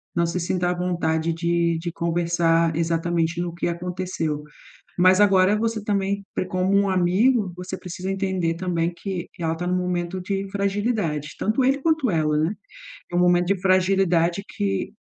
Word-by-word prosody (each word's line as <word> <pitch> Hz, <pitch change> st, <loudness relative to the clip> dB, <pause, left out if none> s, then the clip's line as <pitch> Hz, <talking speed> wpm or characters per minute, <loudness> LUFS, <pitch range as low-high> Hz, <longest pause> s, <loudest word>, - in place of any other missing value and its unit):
não 170 Hz, 0 st, +2 dB
se 170 Hz, +2 st, -2 dB
sinta 175 Hz, +1 st, 0 dB
à 180 Hz, -, +1 dB
vontade 165 Hz, -2 st, 0 dB
de 170 Hz, 0 st, +1 dB
de 170 Hz, +1 st, -4 dB
conversar 170 Hz, -1 st, +1 dB
exatamente 165 Hz, 0 st, 0 dB
no 175 Hz, -1 st, -3 dB
que 170 Hz, -, -2 dB
aconteceu. 170 Hz, -3 st, -3 dB, 0.5 s
Mas 185 Hz, +2 st, +5 dB
agora 195 Hz, 0 st, +5 dB
você 225 Hz, -1 st, -1 dB
também 200 Hz, -1 st, -1 dB
pre -, -, -1 dB
como 185 Hz, +2 st, 0 dB
um 200 Hz, 0 st, +3 dB
amigo, 190 Hz, +3 st, +2 dB
você 180 Hz, +1 st, -6 dB
precisa 180 Hz, +1 st, -6 dB
entender 190 Hz, -4 st, -1 dB
também 170 Hz, -1 st, -1 dB
que 185 Hz, -1 st, -5 dB
ela 165 Hz, -1 st, 0 dB
tá 175 Hz, -, -4 dB
num 180 Hz, -, +1 dB
momento 180 Hz, 0 st, -2 dB
de 195 Hz, +1 st, -3 dB
fragilidade, 200 Hz, -7 st, -1 dB
tanto 220 Hz, +5 st, +1 dB
ele 270 Hz, +2 st, +3 dB
quanto 315 Hz, -5 st, +1 dB
ela, 155 Hz, -2 st, +1 dB
né? 165 Hz, +7 st, 0 dB, 0.6 s
É -, -, -3 dB
um -, -, +3 dB
momento 175 Hz, 0 st, +3 dB
de 195 Hz, 0 st, +1 dB
fragilidade 185 Hz, -2 st, +2 dB
que 95 Hz, -1 st, -2 dB
180 Hz, 165 wpm, -23 LUFS, 170-195 Hz, 0.6 s, Mas